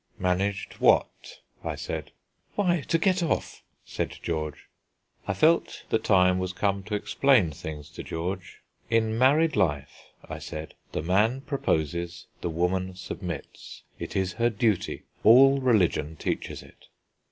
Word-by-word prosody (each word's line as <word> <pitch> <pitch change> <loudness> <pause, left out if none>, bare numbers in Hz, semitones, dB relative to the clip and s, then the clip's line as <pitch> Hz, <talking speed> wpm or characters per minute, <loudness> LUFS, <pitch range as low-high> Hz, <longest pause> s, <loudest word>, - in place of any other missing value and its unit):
"Managed 95 +1 -1
what?" - - +2 0.2
I - - -3
said. 75 -3 -5 0.5
"Why, 175 -5 +2
to 165 - +3
get 185 +2 +2
off," 165 - -2 0.2
said - - -4
George. 75 -3 -3 0.6
I 95 - -1
felt 160 - +2
the 110 - +3
time 90 -3 +4
was 95 0 -3
come 100 0 0
to 105 0 -2
explain 115 - +3
things 75 0 -7
to - - -8
George. 90 +3 -5 0.3
"In 110 -1 +2
married 145 +7 +4
life," 70 -5 -1 0.2
I - - -6
said, 80 0 -7 0.2
"the - - -3
man 105 +9 +2
proposes, 85 - -2 0.2
the 85 - -2
woman 90 +3 -1
submits. 90 -4 -7 0.2
It - - -6
is 95 -1 0
her 120 +1 +2
duty; 110 -3 0 0.2
all 135 +5 +7
religion 90 - +2
teaches - - -4
it." - - -19
95 Hz, 140 wpm, -27 LUFS, 85-120 Hz, 0.6 s, all